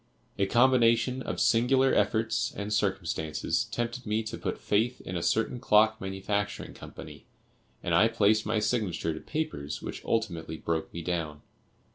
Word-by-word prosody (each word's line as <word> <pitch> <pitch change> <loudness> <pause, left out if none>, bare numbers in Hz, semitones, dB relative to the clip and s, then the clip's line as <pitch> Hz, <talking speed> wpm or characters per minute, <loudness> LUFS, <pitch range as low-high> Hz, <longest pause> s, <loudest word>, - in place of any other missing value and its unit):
A 100 - +2
combination 125 +1 +3
of - - -4
singular 130 +3 +3
efforts 110 0 +1
and 105 +1 -3
circumstances 95 -6 -1
tempted 120 0 -4
me 110 +1 0
to 110 - -5
put - - -3
faith 115 +4 0
in 90 - -6
a 85 - -1
certain 115 +6 0
clock 110 0 +4
manufacturing 100 +2 -3
company, - - -11 0.6
and - - -1
I 110 - +6
placed 110 -1 +3
my - - -1
signature 105 -7 0
to 80 - -6
papers 150 - -4
which - - -6
ultimately 85 -8 -2
broke 80 0 -2
me 85 - -6
down. 80 -4 -3
105 Hz, 150 wpm, -28 LUFS, 90-115 Hz, 0.6 s, I